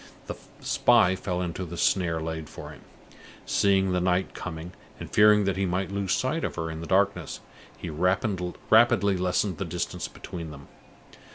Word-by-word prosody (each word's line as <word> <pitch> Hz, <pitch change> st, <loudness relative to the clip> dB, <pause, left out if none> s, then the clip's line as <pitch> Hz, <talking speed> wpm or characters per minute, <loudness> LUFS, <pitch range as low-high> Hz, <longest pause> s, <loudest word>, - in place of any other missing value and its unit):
The -, -, -4 dB, 0.3 s
spy 110 Hz, -6 st, +4 dB
fell 90 Hz, -1 st, -3 dB
into 90 Hz, +1 st, -4 dB
the 85 Hz, -1 st, -7 dB
snare 85 Hz, -3 st, +1 dB
laid 80 Hz, -2 st, -5 dB
for -, -, -9 dB
him. -, -, -13 dB, 0.6 s
Seeing 95 Hz, -1 st, +2 dB
the 90 Hz, 0 st, +1 dB
night 90 Hz, +1 st, 0 dB
coming, 85 Hz, -1 st, -6 dB, 0.3 s
and -, -, -8 dB
fearing 105 Hz, 0 st, +6 dB
that 95 Hz, -1 st, -1 dB
he 95 Hz, -1 st, 0 dB
might 90 Hz, +2 st, -2 dB
lose 100 Hz, -1 st, -1 dB
sight 145 Hz, +9 st, -1 dB
of -, -, -3 dB
her 80 Hz, -1 st, -3 dB
in 80 Hz, 0 st, -6 dB
the 85 Hz, -, -7 dB
darkness, 100 Hz, +1 st, +1 dB, 0.4 s
he 85 Hz, -, -6 dB
rapidly 95 Hz, -, +2 dB
lessened 90 Hz, +2 st, 0 dB
the -, -, -1 dB
distance 85 Hz, +1 st, -3 dB
between 85 Hz, -3 st, -8 dB
them. 70 Hz, -2 st, -12 dB
90 Hz, 170 wpm, -26 LUFS, 85-100 Hz, 0.6 s, fearing